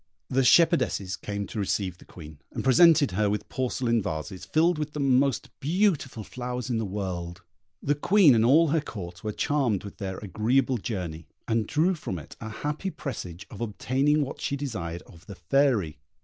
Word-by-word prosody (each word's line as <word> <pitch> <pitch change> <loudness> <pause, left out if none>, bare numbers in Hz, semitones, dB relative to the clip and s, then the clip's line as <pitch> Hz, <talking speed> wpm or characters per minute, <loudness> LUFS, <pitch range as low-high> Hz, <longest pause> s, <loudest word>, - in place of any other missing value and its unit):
The 135 +1 +3
shepherdesses 125 - +3
came 100 +1 -4
to 110 - -6
receive 95 -2 -1
the - - -16
Queen, 75 -3 -12
and - - -4
presented 150 +2 +6
her 105 +3 +1
with 105 +1 -2
porcelain 120 -2 0
vases, 80 +2 -5
filled 165 +1 +2
with 150 -1 -3
the 150 - -4
most 135 -1 +2
beautiful 155 - 0
flowers 125 +2 -5
in 115 - 0
the 110 - -2
world. 90 -3 -5 0.4
The 145 - +2
Queen 165 +1 +5
and 110 -1 +3
all 150 +7 +5
her 160 +1 +2
Court 90 -10 -8
were 110 - -2
charmed 125 -5 0
with 100 - -9
their 95 -3 -4
agreeable 120 +6 0
journey, 85 - -5 0.2
and 115 -1 0
drew 165 +5 +2
from 150 - -5
it 75 - -10
a 110 - -5
happy 150 - -3
presage 95 - -6
of 105 - -9
obtaining 135 +7 +1
what 135 - -7
she 140 - -1
desired 95 -12 -5
of 85 0 -17
the 100 - -8
Fairy. 95 - +1
115 Hz, 180 wpm, -27 LUFS, 95-140 Hz, 0.4 s, presented